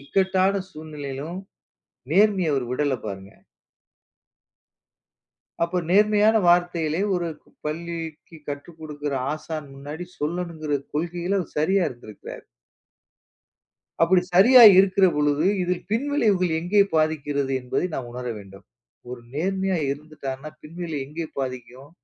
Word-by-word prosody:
இக்கட்டான 190 +5 +1
சூழ்நிலையிலும் 150 +1 -7 0.7
நேர்மைய 190 -3 +3
அவர் 130 -3 -1
விடல 140 -1 0
பாருங்க. 95 0 -7 2.3
அப்போ 175 +2 -2
நேர்மையான 210 +2 +4
வார்த்தைகளை 175 -2 +2
ஒரு 175 -2 -1 0.4
பள்ளிக்கு 165 0 -6
கற்றுக்கொடுக்கிற 145 0 -6 0.2
ஆசான் 155 -1 -6
முன்னாடி 150 +5 -7
சொல்லணுங்கிற 155 -2 -2
கொள்கையில 175 +4 -1
அவர் 175 - -8
சரியா 190 +4 +2
இருந்திருக்கிறார். 115 -4 -11 1.6
அப்படி 180 +2 +5
சரியா 240 +6 +8 0.2
இருக்கிற 195 0 +5
பொழுது 150 +1 +1 0.2
இதில் 180 0 -2
பின் 230 +6 0
விளைவுகள் 195 - +2
எங்கே 200 +4 +4
பாதிக்கிறது 145 -3 0
என்பதை 125 +8 -1
நாம் 120 -2 -4
உணர 125 0 -6
வேண்டும். 95 -1 -14 0.5
ஒரு 125 -1 -7
நேர்மையா 190 +3 0
இருந்துட்டான்னா 140 -1 -6
பின்விளைவு 160 -3 -5
எங்கே 160 +3 -5
பாதிக்கும்? 130 +1 -6
160 Hz, 105 wpm, -24 LUFS, 145-180 Hz, 2.3 s, சரியா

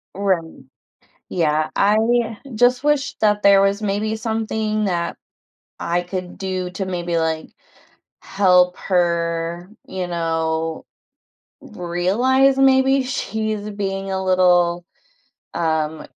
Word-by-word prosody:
Right, 190 -4 +1 0.9
yeah, 155 -2 0
I 225 +2 +2 0.2
just 245 +4 +3
wish 295 -1 +1
that 210 -1 +2
there 200 -1 +6
was 200 +2 +1
maybe 210 +2 -1
something 220 -1 -2
that 170 -3 -2 0.6
I 175 +1 0
could 180 0 -6
do 185 -2 -3
to 195 +1 -3
maybe, 175 -2 -2
like, 160 -1 -2 0.7
help 180 -2 +3
her, 170 -1 -1 0.2
you 185 -1 -4
know, 165 -1 -2 0.8
realize 235 +11 +1
maybe 270 0 +4
she's 215 -4 -3
being 195 -1 -4
a 190 0 -2
little, 175 -2 +3 0.7
um 160 -1 -1
190 Hz, 105 wpm, -20 LUFS, 175-215 Hz, 0.9 s, there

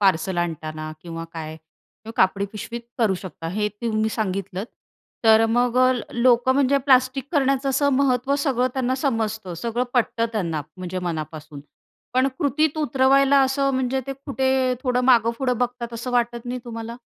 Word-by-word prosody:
Parcel 185 -2 +2
आणताना 155 -2 -3
किंवा 165 -1 -6
काय 160 -2 -6
किवा 160 +7 -16
कापडी 195 +1 +3
पिशवी 230 +2 -6 0.2
करू 215 -5 +3
शकता, 180 -3 -8
हे 210 +4 -1
तुम्ही 215 +1 -1
सांगितलंत. 195 -1 -3 0.6
तर 220 0 +7
अ, 225 - +4
मग 245 +2 +1
अ, 255 0 +5
ल 245 - -2 0.2
लोकं 250 +1 +4
म्हणजे 280 0 +3
प्लास्टिक 260 0 +3
करण्याचं 275 -2 +2
असं 275 +2 +2
महत्त्व 260 0 +2
सगळं 270 -3 +1
त्यांना 260 -1 0
समजतं, 220 - -2
सगळं 235 +8 -2
पटतं 230 -1 +1
त्यांना 170 -8 -1 0.2
म्हणजे 185 0 -5
मनापासून, 155 -3 -5 0.5
पण 260 +1 +3
कृतीत 295 +2 +1
उतरवायला 275 0 +4
असं 275 +1 +1
म्हणजे 260 0 0
ते 275 - -3
कुठे 265 -2 +1
थोडं 250 -1 +1
मागेपुढं 245 0 +3
बघतात 245 -1 -2
असं 235 +2 -5
वाटत 240 -1 0
नाही 250 +1 -3
तुम्हाला? 230 0 -7
235 Hz, 160 wpm, -23 LUFS, 195-260 Hz, 0.6 s, तर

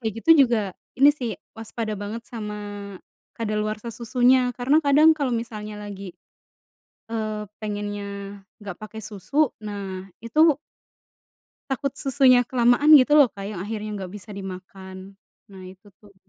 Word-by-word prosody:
kayak 220 -3 -3
gitu - - +3 0.2
juga, 215 -5 -1 0.3
ini 280 +2 +8
sih, 250 -6 -4 0.2
waspada 225 0 -4
banget 210 +3 -6
sama 205 -3 -7 0.4
kadaluarsa 215 +1 -3
susunya. 250 +2 +2
Karena 270 +5 +3
kadang 295 +3 +6
kalau 280 -5 -1
misalnya 215 -2 -6
lagi, 200 -3 -8 1.0
eee, 215 -2 -3 0.2
pengennya 205 -1 -5 0.2
nggak 200 -4 -7
pakai 220 +1 -8
susu, 220 - 0
nah 195 -3 -6 0.2
itu 295 +6 +3 1.1
takut 275 +1 -1
susunya 260 -3 +4
kelamaan 250 +5 +5
gitu 295 +1 +7
loh, 285 - +8
Kak, 200 -4 -10
yang 205 - -6
akhirnya 215 +3 -5
nggak 185 -2 -7
bisa 210 +1 -10
dimakan. 190 0 -9 0.3
Nah, 190 -1 -11
itu 190 +2 -15
tuh. 205 -1 -20
215 Hz, 135 wpm, -24 LUFS, 200-245 Hz, 1.1 s, ini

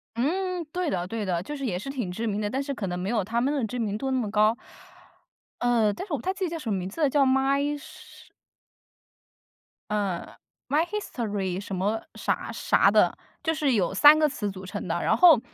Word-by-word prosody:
嗯， 355 +6 -1
对 360 -3 -1
的 180 -1 -2
对 225 +1 -3
的， 175 -3 0
就 295 - -6
是 275 -2 -4
也 185 -7 -1
是 210 +9 -6
挺 245 -10 -3
知 225 +6 -4
名 210 0 -1
的， 205 - -1
但 265 +5 -1
是 280 0 -3
可 200 -6 -4
能 180 - -3
没 185 +3 -3
有 220 -4 +1
他 230 +4 -1
们 275 +4 +1
的 275 - -1
知 250 +3 -5
名 210 -2 -1
度 265 +4 -2
那 260 - +1
么 215 -4 -2
高。 215 +2 +3 1.0
呃， 230 -4 +2
但 375 - -7
是 345 - -5
我 290 - +1
不 - - -11
太 375 - 0
记 385 -1 -2
得 - - -2
叫 330 - -4
什 260 -8 -5
么 195 - +1
名 185 0 -4
字 270 +11 -7
了， 290 - +4
叫 280 0 +3
my 275 +2 +2
什 285 - -14 1.6
嗯， 200 -4 -1 0.4
my 300 +5 +3
history 210 - -3
什 195 -1 -5
么 205 +4 0
啥 - - -2
啥 - - +3
的， - - +4 0.3
就 320 - +1
是 290 -5 +1
有 190 -4 +1
3 295 +10 +8
个 305 -1 +4
词 210 -7 -3
组 190 0 -9
成 185 - -5
的。 170 +1 -1
然 225 - +2
后 325 -6 +8
235 Hz, 275 characters per minute, -26 LUFS, 200-290 Hz, 1.6 s, 3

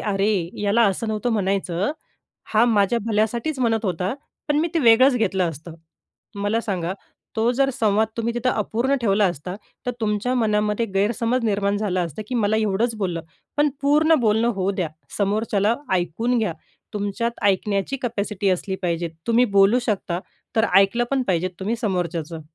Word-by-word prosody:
"अरे, 195 -4 0
याला 210 +3 +3
असं 195 +4 -1
नव्हतं 215 +2 -1
म्हणायचं, 195 -2 0 0.6
हा 220 +1 +5
माझ्या 225 0 +2
भल्यासाठीच 230 +6 0
म्हणत 225 -3 +1
होता. 185 +3 -1 0.3
पण 295 - +2
मी 330 - +1
ते 330 - +2
वेगळंच 255 +1 +6
घेतलं 190 -6 +1
असतं." 160 +2 -10 0.7
मला 215 +3 +1
सांगा, 185 -5 -2 0.4
तो 225 +2 +2
जर 270 +2 +2
संवाद 220 -3 +2
तुम्ही 230 0 -1
तिथं 245 +1 +1
अपूर्ण 235 +6 0
ठेवला 205 -2 +3
असता, 180 +1 -3 0.3
तर 250 - 0
तुमच्या 215 +3 0
मनामध्ये 210 -1 +1
गैरसमज 230 +5 +1
निर्माण 200 -1 +1
झाला 195 -3 0
असता 170 +3 -4
की 250 - -3
मला 215 -1 +2
एवढंच 220 +2 0
बोललं. 180 -6 -2 0.4
पण 295 0 +4
पूर्ण 300 +3 +4
बोलणं 220 +1 +2
होऊ 195 +1 0
द्या, 180 -4 -2 0.3
समोरच्याला 210 +1 +1 0.2
ऐकून 205 +8 0
घ्या. 215 -7 0 0.4
तुमच्यात 210 +3 -2
ऐकण्याची 200 +5 +1
कॅपॅसिटी 210 -4 -1
असली 190 +1 -1
पाहिजेत. 170 -2 -1 0.2
तुम्ही 235 +2 +4
बोलू 195 +5 +6
शकता, 185 -4 -1 0.4
तर 220 0 +4
ऐकलं 195 +5 +5
पण 270 -1 +2
पाहिजेत 185 0 +1
तुम्ही 210 +5 -1
समोरच्याचं. 170 -5 -2
210 Hz, 155 wpm, -22 LUFS, 190-235 Hz, 0.7 s, वेगळंच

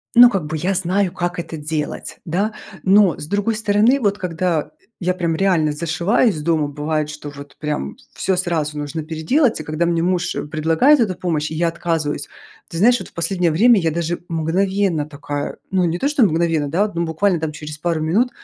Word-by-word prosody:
Ну, 245 +1 +10
как 195 -8 -1
бы 155 +1 -4
я 180 +5 0
знаю, 185 +1 +1
как 175 0 -3
это 165 -1 -5
делать, 150 0 -4
да. 195 +6 -1 0.3
Но 195 -3 +5
с - - -6
другой 205 +4 0
стороны, 220 +5 +3
вот 205 -3 +1
когда 165 -4 -1 0.3
я 180 0 0
прям 170 -3 -1
реально 170 -4 +2
зашиваюсь 170 +4 +1
дома, 155 -2 +1
бывает, 150 +1 -2
что 150 -1 -7
вот 140 0 -11
прям 150 - -3 0.2
всё 190 -2 0
сразу 160 -4 -1
нужно 150 +2 -4
переделать. 165 - +1
И - - -5
когда 155 +3 -1
мне 170 -1 +1
муж 180 0 0 0.2
предлагает 165 - +4
эту 195 -5 +1
помощь, 160 -4 -2
я 170 +1 +1
отказываюсь. 160 -4 -2 0.4
Ты - - -9
знаешь, 240 +7 +4
вот - - -9
в - - -31
последнее 170 0 0
время 230 +10 +5
я 165 - +1
даже 170 +1 -2
мгновенно 175 0 0
такая, 145 0 -5
ну 190 -1 +2
не 170 0 0
то 275 - +1
что 290 -4 +3
мгновенно, 165 -4 +1
да, 200 +8 +1
ну, 170 0 0
буквально 160 -1 0
через 150 0 -8
пару 165 -1 -1
минут, 200 +11 +2
170 Hz, 190 wpm, -20 LUFS, 155-195 Hz, 0.4 s, Ну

